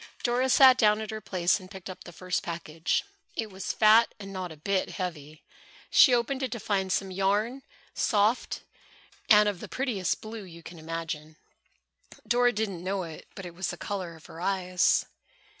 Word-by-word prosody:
Dora 250 +2 +1
sat 260 -1 +7
down 210 -1 +4
at 220 -1 -5
her 215 0 -5
place 180 -1 +1
and 185 -1 -13
picked 190 -3 -9
up 185 0 -9
the 175 - -9
first 180 +1 -2
package. 165 -1 -2 0.3
It 220 -2 -3
was 190 0 -4
fat 220 +1 +5
and 195 -1 -8
not 185 -2 -4
a 160 - -11
bit 190 +5 -1
heavy. 155 -5 -6 0.5
She 265 - +7
opened 250 +3 +1
it 260 -3 -2
to 235 - -5
find 195 -3 -1
some 195 0 0
yarn, 205 +7 0 0.3
soft, 215 +1 +1 0.7
and 210 -1 +7
of 200 -4 -1
the - - -8
prettiest 235 -9 -1
blue 220 0 -7
you 170 -3 -12
can 170 0 -10
imagine. 160 -1 -5 0.9
Dora 245 +2 +4
didn't 205 -6 -3
know 190 0 -1
it, 160 -2 -9
but 195 - -7
it 175 - -8
was 180 +1 -3
the 175 - -4
color 185 -4 -5
of 160 - -17
her 165 - -10
eyes. 185 -1 +2
195 Hz, 185 wpm, -28 LUFS, 175-220 Hz, 0.9 s, sat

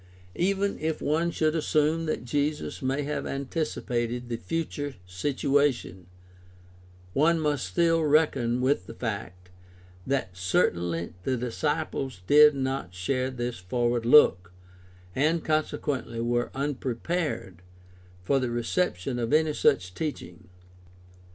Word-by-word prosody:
Even 195 +2 0
if 160 0 -1
one 160 +3 +1
should 155 -2 +1
assume 160 0 +1
that 155 - -2
Jesus 145 +4 -2
may 135 +2 0
have 150 +1 -3
anticipated 125 -4 -2
the 115 - -2
future 145 -2 -3
situation, 125 -1 0 1.1
one 165 +4 +3
must 145 -10 0
still 165 - +2
reckon 140 -6 +2
with 130 -8 +1
the 115 - -9
fact 100 -6 -5 0.6
that 130 -10 -1
certainly 85 -2 0
the 130 +7 -1
disciples 135 - -2
did 150 +5 +7
not 130 -9 -3
share 130 +8 -1
this 120 -4 -4
forward 120 +5 0
look, 95 -10 +6 0.6
and 155 +4 +1
consequently 145 -6 -1
were 120 +1 0
unprepared 135 - -3 0.6
for 135 +8 +2
the 130 -2 -1
reception 120 - -1
of 115 +1 -2
any 155 0 +3
such 90 -9 +2
teaching. 95 - -5
135 Hz, 115 wpm, -27 LUFS, 115-150 Hz, 1.1 s, did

